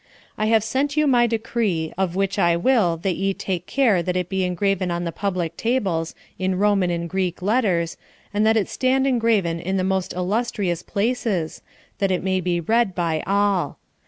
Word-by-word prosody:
I 215 Hz, -, -1 dB
have 220 Hz, -1 st, +4 dB
sent 275 Hz, +6 st, -1 dB
you 305 Hz, -, +4 dB
my 245 Hz, -4 st, +4 dB
decree, 220 Hz, -8 st, -1 dB
of 185 Hz, -2 st, -1 dB
which 195 Hz, 0 st, 0 dB
I 170 Hz, -1 st, +4 dB
will 185 Hz, -5 st, +2 dB
that 190 Hz, -3 st, 0 dB
ye 195 Hz, 0 st, 0 dB
take 185 Hz, -3 st, -4 dB
care 235 Hz, -10 st, +3 dB
that 180 Hz, +1 st, -2 dB
it 180 Hz, -1 st, -1 dB
be 190 Hz, -1 st, 0 dB
engraven 185 Hz, +1 st, 0 dB
on 175 Hz, 0 st, -2 dB
the 170 Hz, -, -2 dB
public 180 Hz, -2 st, -2 dB
tables, 190 Hz, -10 st, -1 dB, 0.2 s
in 185 Hz, 0 st, 0 dB
Roman 200 Hz, -2 st, +2 dB
and 170 Hz, 0 st, -2 dB
Greek 185 Hz, -1 st, -2 dB
letters, 190 Hz, -6 st, +1 dB, 0.4 s
and 205 Hz, +1 st, +1 dB
that 220 Hz, +1 st, +4 dB
it 210 Hz, -, +1 dB
stand 265 Hz, +1 st, +1 dB
engraven 225 Hz, -10 st, +1 dB
in 190 Hz, +3 st, -2 dB
the 185 Hz, -, 0 dB
most 190 Hz, -1 st, -1 dB
illustrious 185 Hz, -2 st, -1 dB
places, 205 Hz, -6 st, -1 dB, 0.4 s
that 195 Hz, -, +1 dB
it 185 Hz, -1 st, 0 dB
may 190 Hz, -1 st, 0 dB
be 175 Hz, -1 st, 0 dB
read 220 Hz, +2 st, +1 dB
by 165 Hz, -3 st, 0 dB
all. 200 Hz, -5 st, +1 dB
190 Hz, 190 wpm, -22 LUFS, 175-220 Hz, 0.4 s, have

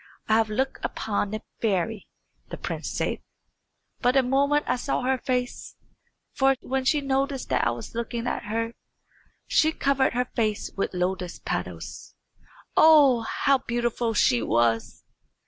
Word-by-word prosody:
"I 220 Hz, -, +2 dB
have 220 Hz, 0 st, +3 dB
looked 265 Hz, +5 st, -2 dB
upon 205 Hz, -1 st, -2 dB
a 215 Hz, -, -6 dB, 0.2 s
fairy," 210 Hz, 0 st, -1 dB, 0.4 s
the -, -, -6 dB
prince -, -, -4 dB
said. -, -, -2 dB, 0.8 s
"But 250 Hz, +2 st, +2 dB
a 265 Hz, -, +5 dB
moment 280 Hz, +3 st, +2 dB
I -, -, +1 dB
saw 250 Hz, +1 st, -2 dB
her 260 Hz, 0 st, +1 dB
face; 250 Hz, -1 st, -3 dB, 0.6 s
for 270 Hz, -1 st, +3 dB
when 265 Hz, 0 st, -2 dB
she 295 Hz, +2 st, +3 dB
noticed 270 Hz, 0 st, -1 dB
that 130 Hz, -2 st, +2 dB
I -, -, +3 dB
was 120 Hz, 0 st, -6 dB
looking 235 Hz, 0 st, -3 dB
at -, -, -2 dB
her 230 Hz, +2 st, -2 dB, 0.7 s
she 315 Hz, -, +3 dB
covered 275 Hz, -3 st, +1 dB
her 250 Hz, +1 st, +1 dB
face 215 Hz, -4 st, -2 dB
with 195 Hz, -, -2 dB
lotus 180 Hz, 0 st, -2 dB
petals. -, -, -5 dB, 0.6 s
Oh, 290 Hz, -6 st, +7 dB
how 275 Hz, -1 st, +2 dB
beautiful 240 Hz, -2 st, -1 dB
she 120 Hz, -, +3 dB
was! 115 Hz, 0 st, 0 dB
240 Hz, 145 wpm, -26 LUFS, 210-270 Hz, 0.8 s, Oh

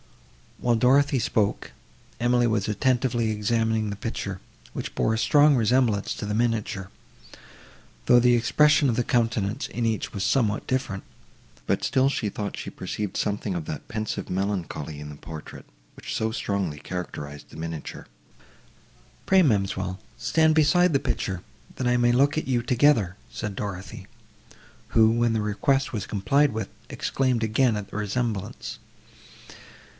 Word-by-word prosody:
While 120 Hz, -1 st, +1 dB
Dorothée 135 Hz, +2 st, +4 dB
spoke, 105 Hz, -3 st, 0 dB, 0.5 s
Emily 120 Hz, 0 st, +3 dB
was 110 Hz, -4 st, +1 dB
attentively 120 Hz, 0 st, +1 dB
examining 110 Hz, 0 st, 0 dB
the 100 Hz, -, -4 dB
picture, 100 Hz, -2 st, -4 dB, 0.3 s
which -, -, -5 dB
bore 110 Hz, -, +1 dB
a -, -, 0 dB
strong 145 Hz, +4 st, +5 dB
resemblance 115 Hz, -3 st, +2 dB
to -, -, -5 dB
the 105 Hz, -, -2 dB
miniature, 110 Hz, -4 st, -1 dB, 1.2 s
though 120 Hz, -, +6 dB
the 120 Hz, 0 st, +5 dB
expression 145 Hz, +4 st, +4 dB
of 115 Hz, -, +1 dB
the 120 Hz, -, +1 dB
countenance 115 Hz, 0 st, 0 dB
in 120 Hz, -, -3 dB
each 110 Hz, -2 st, -1 dB
was 100 Hz, -2 st, -3 dB
somewhat 110 Hz, -3 st, +1 dB
different; 130 Hz, -7 st, -2 dB, 0.6 s
but -, -, 0 dB
still 135 Hz, +1 st, +3 dB
she 110 Hz, -6 st, -1 dB
thought 100 Hz, 0 st, -5 dB
she -, -, -5 dB
perceived 105 Hz, -3 st, -5 dB
something 105 Hz, -1 st, -1 dB
of 85 Hz, -3 st, -3 dB
that 75 Hz, -1 st, -6 dB
pensive 110 Hz, 0 st, -4 dB
melancholy 90 Hz, -6 st, -3 dB
in 75 Hz, 0 st, -7 dB
the 75 Hz, -, -8 dB
portrait, 80 Hz, +1 st, -10 dB, 0.3 s
which -, -, -7 dB
so 110 Hz, 0 st, 0 dB
strongly 100 Hz, -9 st, -2 dB
characterised 75 Hz, -4 st, -6 dB
the -, -, -12 dB
miniature. 80 Hz, -1 st, -6 dB, 1.2 s
"Pray, 190 Hz, -1 st, +6 dB
ma'amselle, 95 Hz, -, 0 dB, 0.2 s
stand 160 Hz, -1 st, +3 dB
beside 165 Hz, +3 st, +4 dB
the 140 Hz, -, +4 dB
picture, 95 Hz, -8 st, -3 dB, 0.3 s
that 130 Hz, -, -2 dB
I 125 Hz, 0 st, +3 dB
may 120 Hz, 0 st, +3 dB
look 140 Hz, +5 st, +3 dB
at 155 Hz, -, -2 dB
you 125 Hz, -2 st, +1 dB
together," 120 Hz, -7 st, +3 dB
said 110 Hz, -3 st, -5 dB
Dorothée, 95 Hz, -2 st, -6 dB, 0.8 s
who, 110 Hz, -1 st, +5 dB
when 120 Hz, 0 st, +2 dB
the 110 Hz, -, 0 dB
request 135 Hz, +7 st, 0 dB
was 105 Hz, -3 st, -3 dB
complied 135 Hz, +7 st, +2 dB
with, 110 Hz, -3 st, -3 dB, 0.2 s
exclaimed 130 Hz, -4 st, 0 dB
again 110 Hz, +2 st, +2 dB
at 105 Hz, -1 st, -5 dB
the -, -, -6 dB
resemblance. 105 Hz, -1 st, -3 dB
110 Hz, 150 wpm, -25 LUFS, 100-125 Hz, 1.2 s, though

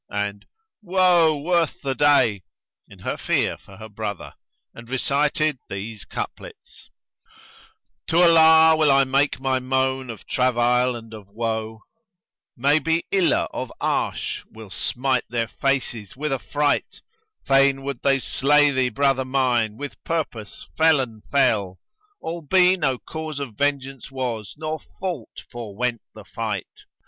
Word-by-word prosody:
and, 105 Hz, 0 st, -4 dB, 0.3 s
"Woe 175 Hz, -5 st, +3 dB
worth 165 Hz, +1 st, 0 dB
the 135 Hz, -1 st, -1 dB
day!" 135 Hz, -8 st, +3 dB, 0.5 s
in -, -, -14 dB
her -, -, -4 dB
fear -, -, 0 dB
for 95 Hz, -, -16 dB
her 110 Hz, +1 st, -9 dB
brother, 105 Hz, -2 st, -6 dB, 0.4 s
and 115 Hz, 0 st, -12 dB
recited 145 Hz, +2 st, 0 dB
these 100 Hz, +2 st, -6 dB
couplets, -, -, -8 dB, 1.2 s
"To 165 Hz, -, +1 dB
Allah 160 Hz, -1 st, +7 dB
will 155 Hz, -2 st, +3 dB
I 135 Hz, 0 st, +5 dB
make 135 Hz, +1 st, +1 dB
my 130 Hz, -1 st, 0 dB
moan 130 Hz, 0 st, -1 dB
of 115 Hz, -3 st, -8 dB
travail 125 Hz, 0 st, +2 dB
and 115 Hz, -1 st, -10 dB
of 105 Hz, -3 st, -10 dB
woe, 110 Hz, 0 st, -4 dB, 0.4 s
* -, -, -69 dB
Maybe 155 Hz, +5 st, +2 dB
Iláh 190 Hz, -3 st, +2 dB
of -, -, -5 dB
Arsh[FN#121] -, -, -2 dB
will 110 Hz, -2 st, -12 dB
smite 130 Hz, +4 st, -1 dB
their 115 Hz, -1 st, -1 dB
faces 125 Hz, -4 st, -2 dB
with 150 Hz, 0 st, -2 dB
affright: 145 Hz, +2 st, -1 dB, 0.4 s
Fain 135 Hz, 0 st, +3 dB
would 140 Hz, -3 st, -5 dB
they 135 Hz, -1 st, +3 dB
slay 145 Hz, +2 st, +3 dB
thee, 130 Hz, -2 st, +1 dB
brother 135 Hz, +1 st, +1 dB
mine, 125 Hz, -5 st, 0 dB
with 145 Hz, +1 st, -8 dB
purpose 145 Hz, -10 st, -4 dB
felon 135 Hz, -9 st, +2 dB
fell; 100 Hz, -9 st, +2 dB, 0.2 s
* 420 Hz, -1 st, -39 dB
Albe 180 Hz, +3 st, +2 dB
no 130 Hz, -6 st, +1 dB
cause 155 Hz, +1 st, -6 dB
of 135 Hz, -5 st, -5 dB
vengeance 135 Hz, +1 st, -2 dB
was, 120 Hz, -7 st, -4 dB
nor 155 Hz, 0 st, -4 dB
fault 175 Hz, -, -7 dB
forewent 120 Hz, +1 st, -3 dB
the 110 Hz, -2 st, -12 dB
fight. 110 Hz, -5 st, -5 dB
135 Hz, 135 wpm, -23 LUFS, 115-150 Hz, 1.2 s, Allah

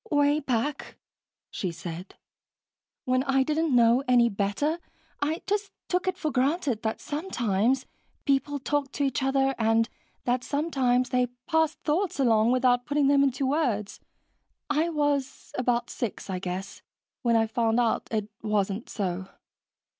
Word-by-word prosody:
"Way 290 Hz, 0 st, +3 dB
back," 270 Hz, +1 st, -2 dB, 0.5 s
she 185 Hz, -, -3 dB
said, 170 Hz, +2 st, -8 dB, 0.9 s
"when 255 Hz, 0 st, +2 dB
I 270 Hz, -1 st, +3 dB
didn't 310 Hz, -1 st, +1 dB
know 235 Hz, +1 st, +5 dB
any 240 Hz, -2 st, +5 dB
better, 210 Hz, -, -1 dB, 0.4 s
I 310 Hz, +3 st, -1 dB
just 405 Hz, 0 st, -1 dB, 0.2 s
took 360 Hz, +1 st, 0 dB
it 370 Hz, -1 st, 0 dB
for 310 Hz, -4 st, -2 dB
granted 270 Hz, -2 st, +1 dB
that 220 Hz, 0 st, -2 dB
sometimes 250 Hz, -, 0 dB, 0.4 s
people 280 Hz, +1 st, +1 dB
talked 285 Hz, 0 st, -1 dB
to 285 Hz, -, -1 dB
each 270 Hz, -2 st, 0 dB
other 270 Hz, 0 st, +2 dB
and 225 Hz, 0 st, +3 dB, 0.4 s
that 245 Hz, 0 st, 0 dB
sometimes 260 Hz, -5 st, +1 dB
they 250 Hz, 0 st, +2 dB, 0.2 s
passed 320 Hz, -1 st, +1 dB
thoughts 350 Hz, +2 st, 0 dB
along 230 Hz, -3 st, +4 dB
without 250 Hz, -1 st, +2 dB
putting 290 Hz, -1 st, +2 dB
them 280 Hz, -1 st, +5 dB
into 275 Hz, 0 st, +1 dB
words. 250 Hz, -8 st, 0 dB, 0.7 s
I 310 Hz, +3 st, +2 dB
was 290 Hz, -4 st, -1 dB
about 245 Hz, -1 st, 0 dB
six, 215 Hz, -4 st, -4 dB
I 185 Hz, -, -2 dB
guess, 185 Hz, +1 st, -5 dB, 0.4 s
when 235 Hz, -1 st, +2 dB
I 225 Hz, 0 st, +4 dB
found 225 Hz, +1 st, +1 dB
out 235 Hz, -2 st, +1 dB
it 215 Hz, -2 st, -1 dB
wasn't 210 Hz, 0 st, -1 dB
so." 190 Hz, -3 st, -3 dB
255 Hz, 145 wpm, -27 LUFS, 225-290 Hz, 0.9 s, know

